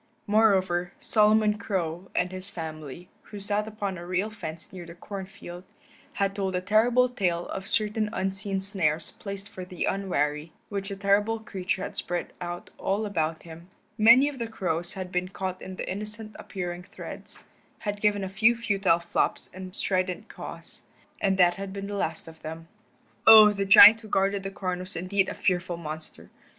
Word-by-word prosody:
Moreover, 190 -4 +2
Solomon 215 0 +3
Crow 185 -4 -3
and 180 0 +1
his 185 +1 -7
family, 160 -2 -7
who 205 - -10
sat 205 +1 -1
upon 205 -4 -4
a 175 - -8
rail 185 +4 -1
fence 165 -6 -8
near 180 -2 -7
the 170 0 -11
corn 195 +1 -7
field, 180 -3 -10 0.5
had 195 0 0
told 190 -2 -2
a - - +1
terrible 235 +6 +3
tale 180 -8 -1
of 195 0 -5
certain 215 0 0
unseen 195 -1 -2
snares 165 -6 0
placed 200 0 -8
for 195 -3 -8
the 180 -1 -4
unwary, 155 -5 -1 0.2
which 200 -1 -3
the 200 - -4
terrible 205 +3 +2
creature 190 -3 -3
had - - -6
spread 175 -1 -3
out 175 0 -6
all 200 +3 -1
about 160 -5 -2
him. 165 +1 -12 0.3
Many 235 +5 +7
of 285 -3 -5
the 230 - -2
crows 175 -5 -2
had 185 -1 -6
been 180 0 -1
caught 185 0 -5
in 190 - -7
the - - -6
innocent 210 +2 -6
appearing 180 -2 -5
threads, 180 - -8 0.3
had 205 -1 -4
given 205 -1 +2
a - - -2
few 215 +5 +3
futile 200 -7 +2
flops 170 0 -2
and 185 0 -2
strident 185 -1 +1
caws, - - -10 0.4
and 195 -1 +2
that 175 -1 +4
had 195 0 -5
been 200 0 -5
the 205 - -6
last 165 -6 -3
of 160 0 -13
them. 160 +1 -8 0.6
Oh, 215 -1 +10
the 200 -1 -2
giant 210 +3 +10
who 220 - -11
guarded 195 0 +1
the 195 - -4
corn 185 -2 -3
was 185 +1 -8
indeed 190 +3 0
a - - -5
fearful 180 -2 0
monster. 155 -1 -9
195 Hz, 180 wpm, -27 LUFS, 175-205 Hz, 0.6 s, Oh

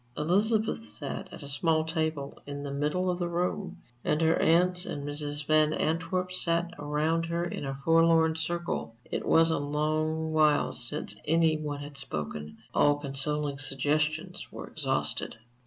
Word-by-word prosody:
Elizabeth 210 - +2
sat 115 +6 -6
at 165 - -9
a - - -7
small 155 +3 +2
table 160 -3 -2
in 145 0 -5
the 140 - -4
middle 150 +6 0
of 175 - -3
the 175 - 0
room, 180 +2 -2 0.3
and 150 - +1
her 160 0 +4
aunts 180 +2 +4
and 145 -6 -5
Mrs. 145 0 -2
Van 155 0 +4
Antwerp 175 +4 -1
sat 170 -1 +1
around 155 +3 0
her 170 +1 -1
in 170 - -4
a 135 0 -4
forlorn 165 0 +5
circle. 170 -7 -3
It - - -3
was 165 0 +5
a 160 - +1
long 155 +2 -1
while 155 -1 +3
since 115 -4 -4
any 160 0 +3
one 150 -2 -4
had 145 -1 -9
spoken; 75 - -5 0.2
all 145 0 +4
consoling 145 0 0
suggestions 150 +3 0
were - - -7
exhausted. - - -2
155 Hz, 155 wpm, -29 LUFS, 145-165 Hz, 0.3 s, forlorn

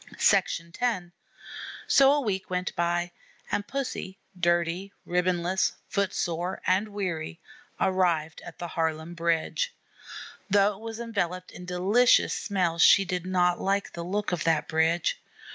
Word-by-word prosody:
X - - +3 1.3
So 275 0 +6
a 290 0 +2
week 195 -6 -2
went 180 0 -2
by, 175 0 0 0.4
and 205 0 -1
Pussy, 245 -8 -4 0.2
dirty, 175 +2 0
ribbon 180 0 +1
less, 185 +2 +1 0.2
foot 200 -1 0
sore, 175 +2 -2
and 190 +4 +2
weary, 180 - -4 0.4
arrived 170 -4 +1
at - - -10
the 175 - -5
Harlem 160 0 -2
Bridge. 170 - -1 0.7
Though 200 +1 +4
it 195 - -13
was 225 0 -7
enveloped 185 -6 -3
in 180 - -10
delicious 195 +7 +3
smells, 175 -5 0
she 195 - +7
did 180 -1 -3
not 180 -1 +2
like 200 +1 0
the 170 - -5
look 200 +4 -2
of 175 -3 -1
that 160 -2 +2
bridge. 160 +1 +1
180 Hz, 140 wpm, -27 LUFS, 170-200 Hz, 1.3 s, she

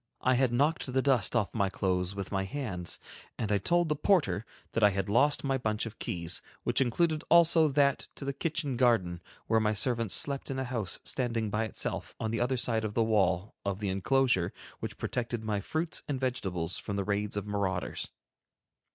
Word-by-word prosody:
I 130 - +3
had 130 -1 +3
knocked 140 +2 +1
the 130 +1 +2
dust 125 -6 +2
off 105 -4 +1
my 100 -4 +1
clothes 90 0 -1
with 100 -2 -5
my 95 -1 0
hands, 95 -6 -3 0.4
and 105 -2 -2
I 100 - +3
told 175 - +2
the 150 - +1
porter 150 - +2 0.2
that 115 - -1
I 105 - +7
had 95 -1 -2
lost 140 +7 +3
my 135 -1 0
bunch 110 -2 -1
of 115 -1 -8
keys, 85 0 -2 0.2
which - - +2
included 155 +5 +1
also 170 -1 +6
that 140 -1 +2
to 140 - -6
the 140 - -1
kitchen 150 -4 -2
garden, 100 -9 +2 0.2
where 110 0 +3
my 110 -1 +2
servants 115 -1 +1
slept 140 -1 0
in 135 - -3
a 130 - -1
house 115 -7 -1
standing 115 -4 -1
by 110 +2 0
itself, 110 - -4
on 110 - -2
the 115 - -1
other 130 +2 +1
side 115 -2 +1
of 105 -1 -3
the 115 - +3
wall 100 -3 +1
of 100 -1 -1
the 105 -1 -2
inclosure 100 -1 +2 0.3
which - - -5
protected 120 -2 -2
my 105 -2 -1
fruits 160 - -2
and 140 -3 -2
vegetables 95 -10 -2
from 105 - -4
the 100 - 0
raids 105 +1 -1
of 105 - -2
marauders. 100 -3 -2
115 Hz, 200 wpm, -30 LUFS, 100-135 Hz, 0.4 s, I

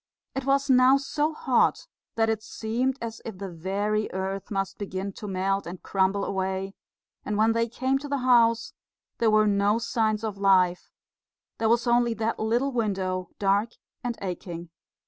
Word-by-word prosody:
It 270 -1 -4
was 275 0 +2
now 260 0 +6
so 295 +3 -1
hot 265 -5 +1 0.3
that 225 0 +2
it 220 -1 0
seemed 240 +5 -2
as 230 -1 -6
if 220 -4 -7
the 195 -1 -6
very 200 +5 -1
earth 190 +1 -3
must 195 -1 -3
begin 195 -1 -4
to 210 - -8
melt 195 0 -1
and 175 +1 -8
crumble 195 +1 +1
away; 190 0 -2 0.5
and 210 - -2
when 220 +1 +4
they 230 0 +1
came 260 +3 0
to 290 - -7
the 285 0 -1
house 230 -2 +4 0.5
there 230 - +3
were 215 0 +4
no 205 +1 +2
signs 220 -2 0
of 210 -3 -4
life 185 -3 +3 0.7
there 225 -1 +2
was 235 +1 +3
only 240 -1 +3
that 225 +1 -2
little 235 +5 +1
window, 190 -6 -1
dark 200 +3 +1 0.3
and 240 -1 -3
aching. 175 -2 -6
215 Hz, 165 wpm, -26 LUFS, 195-235 Hz, 0.7 s, now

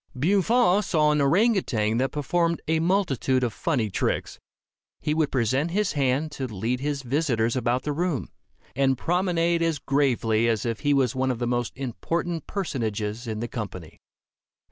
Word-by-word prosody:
Buffon 200 - +3
saw 155 -6 +2
an 150 -1 +2
orang 190 +12 +4
outang 115 - 0
that 135 +1 +1
performed 170 +3 0
a 160 0 +2
multitude 160 - +1
of 120 -3 -1
funny 125 - -1
tricks. - - -2 0.6
He 150 - -1
would 155 -2 +1
present 130 +5 +1
his 205 +3 0
hand 140 +1 0
to 135 -3 -4
lead 115 +3 -2
his 140 0 -2
visitors 125 -4 0
about 125 0 0
the 150 - -2
room, 165 -4 -2 0.5
and 135 -1 +2
promenade 170 0 +1
as 165 -2 +1
gravely 120 -6 +1
as 115 -2 0
if 115 -2 -2
he 145 0 +2
was 130 -2 +2
one 130 0 0
of 125 - -1
the 120 - -2
most 120 -2 -1
important 165 +6 -3
personages 115 - -3
in 110 -1 -3
the 120 - -2
company. 100 -9 -7
135 Hz, 165 wpm, -25 LUFS, 120-165 Hz, 0.6 s, orang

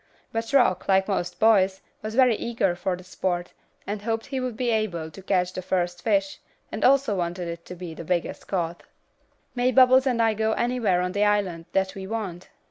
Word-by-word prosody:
But 225 +2 -3
Rock, 245 -10 +3
like 190 0 +3
most 180 -3 -2
boys, 195 -4 +4 0.2
was 215 +1 -5
very 255 -3 +5
eager 205 -6 -1
for 180 +1 -2
the 180 - -12
sport, 180 -1 -3 0.3
and 205 0 -4
hoped 225 +1 -2
he 275 -2 -3
would 250 -3 -4
be 245 -1 0
able 180 -8 -1
to 175 - -11
catch 180 -1 0
the 185 - -4
first 175 -1 -1
fish, 195 -2 0 0.3
and 215 - -4
also 275 -4 +4
wanted 175 0 -3
it 170 0 -7
to 180 - -8
be 175 -2 -7
the 165 - -8
biggest 175 +1 -2
caught. 170 -3 -2 0.7
"May 250 +1 +1
Bubbles 260 +1 +6
and 245 -3 +1
I 225 -1 +3
go 220 +1 0
anywhere 235 -7 +1
on 180 0 -1
the 200 +2 +1
island 195 -5 0
that 190 0 +1
we 190 -1 -7
want?" 195 -5 -5
195 Hz, 205 wpm, -25 LUFS, 180-225 Hz, 0.7 s, Bubbles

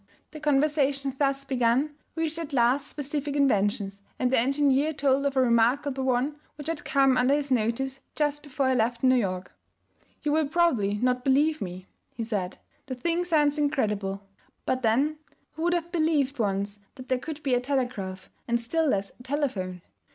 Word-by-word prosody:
The 310 - -8
conversation 280 -2 +1
thus 275 -1 +1
begun 260 +2 +1 0.2
reached 325 0 -2
at 310 -3 -5
last 250 +2 +3
specific 290 0 -3
inventions, 205 -7 +1 0.2
and 255 -1 +1
the 265 - +4
engineer 275 +3 +2
told 275 0 +2
of 275 -1 -3
a - - +5
remarkable 255 +3 +2
one 265 +4 +1 0.2
which 295 - -9
had 325 -2 -3
come 270 -2 +3
under 255 +3 +4
his 290 -2 -2
notice 255 +3 0 0.2
just 295 -1 0
before 275 -2 -1
he 260 - +2
left 235 +1 0
New 255 0 +6
York. 190 -7 -1 0.7
'You 300 - +1
will 310 -1 +2
probably 280 -11 +2
not 250 +3 0
believe 295 +4 +2
me,' 185 0 -6 0.3
he 230 - -3
said; 200 -5 -3 0.3
'the 260 - -4
thing 335 +7 -1
sounds 300 -3 +2
incredible; 210 -9 0 0.4
but 255 - 0
then 265 +7 +2 0.3
who 320 - -9
would 345 +1 +2
have 345 -1 -2
believed 310 -5 +1
once 200 -1 -1 0.2
that 255 -2 -10
there 255 -1 +1
could 305 +3 -7
be 270 -3 +1
a 245 - +4
telegraph, 245 -9 -2 0.2
and 235 0 +1
still 315 +8 0
less 200 -7 0
a - - -12
telephone? 240 - -2
270 Hz, 175 wpm, -27 LUFS, 235-295 Hz, 0.7 s, New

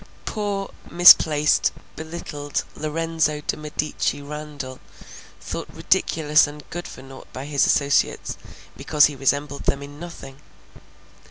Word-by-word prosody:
Poor 205 -2 -3 0.2
misplaced, 155 -4 +6 0.2
belittled 155 -3 -5
Lorenzo 155 -1 -1
de - - -2
Medici 150 -1 -2
Randall, 145 -2 -7 0.6
thought - - -6
ridiculous 155 -1 +2
and 145 0 -11
good 175 +1 -5
for 130 - -11
naught 135 0 -13
by 130 - -7
his 145 -1 +2
associates, 140 -1 +1 0.4
because 150 -1 +4
he 145 - -1
resembled 140 +1 -1
them 140 0 0
in 145 +1 -11
nothing! 150 -5 -10
150 Hz, 115 wpm, -23 LUFS, 140-160 Hz, 0.6 s, misplaced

